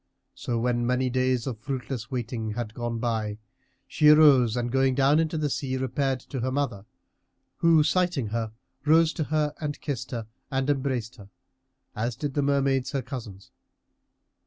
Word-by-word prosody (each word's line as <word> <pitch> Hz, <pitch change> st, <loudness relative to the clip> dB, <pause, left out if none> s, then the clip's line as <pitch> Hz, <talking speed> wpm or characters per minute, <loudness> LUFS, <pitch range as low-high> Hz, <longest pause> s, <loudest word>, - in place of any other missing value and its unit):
So 120 Hz, -, -3 dB
when 120 Hz, 0 st, 0 dB
many 125 Hz, 0 st, +1 dB
days 130 Hz, -1 st, +1 dB
of 120 Hz, -5 st, -4 dB
fruitless 125 Hz, -2 st, -5 dB
waiting 115 Hz, -3 st, -3 dB
had 110 Hz, -1 st, -4 dB
gone 120 Hz, 0 st, -3 dB
by, 110 Hz, -3 st, -2 dB, 0.5 s
she 150 Hz, -, +4 dB
arose 135 Hz, -7 st, +6 dB
and 120 Hz, 0 st, -1 dB
going 135 Hz, 0 st, +2 dB
down 140 Hz, +3 st, +4 dB
into 160 Hz, 0 st, 0 dB
the 150 Hz, -1 st, 0 dB
sea, 130 Hz, -1 st, -2 dB
repaired 130 Hz, +1 st, -1 dB
to 135 Hz, -, -6 dB
her 130 Hz, +2 st, -1 dB
mother, 130 Hz, -7 st, -2 dB, 0.7 s
who 165 Hz, -2 st, +5 dB
sighting 165 Hz, -, +1 dB
her 115 Hz, 0 st, -2 dB, 0.3 s
rose 160 Hz, +2 st, +4 dB
to 155 Hz, -, -2 dB
her 150 Hz, -1 st, 0 dB
and 145 Hz, -1 st, -3 dB
kissed 130 Hz, -4 st, -4 dB
her 115 Hz, -3 st, -4 dB, 0.2 s
and 135 Hz, 0 st, -1 dB
embraced 130 Hz, -4 st, -2 dB
her, 100 Hz, -2 st, -13 dB, 0.7 s
as 115 Hz, +2 st, -2 dB
did 145 Hz, -2 st, -4 dB
the 145 Hz, -, +1 dB
Mermaids 140 Hz, -1 st, +1 dB
her 135 Hz, -2 st, -1 dB
cousins. 115 Hz, -7 st, -8 dB
130 Hz, 165 wpm, -26 LUFS, 120-145 Hz, 0.7 s, arose